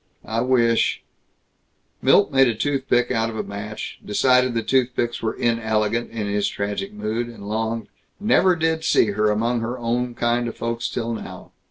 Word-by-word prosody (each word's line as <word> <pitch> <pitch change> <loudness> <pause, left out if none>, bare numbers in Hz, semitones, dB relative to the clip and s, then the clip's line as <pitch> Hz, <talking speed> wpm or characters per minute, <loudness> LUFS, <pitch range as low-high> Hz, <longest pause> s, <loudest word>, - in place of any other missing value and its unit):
I 115 +1 -1
wish 120 -2 +2 0.5
" - - -45
Milt - - +4
made 135 -1 +5
a 115 - 0
toothpick 130 -1 0
out 115 -2 +1
of 110 - -6
a - - -2
match, 105 +2 -7
decided 125 +3 +3
that 115 -1 -2
toothpicks 120 -2 +1
were 110 - -2
inelegant 115 -1 0
in 110 -2 -4
his 100 0 0
tragic 105 - -3
mood, 120 - -3
and 115 -4 -10
longed: 110 +1 -2 0.3
"Never 190 -3 +4
did 160 -1 0
see 110 -8 +3
her 105 +1 +1
among 115 +3 +1
her 120 +2 -3
own 120 +1 -2
kind 120 0 0
of 115 - -6
folks 115 0 -2
till 115 0 -3
now. 110 - -8
115 Hz, 175 wpm, -22 LUFS, 110-125 Hz, 0.5 s, made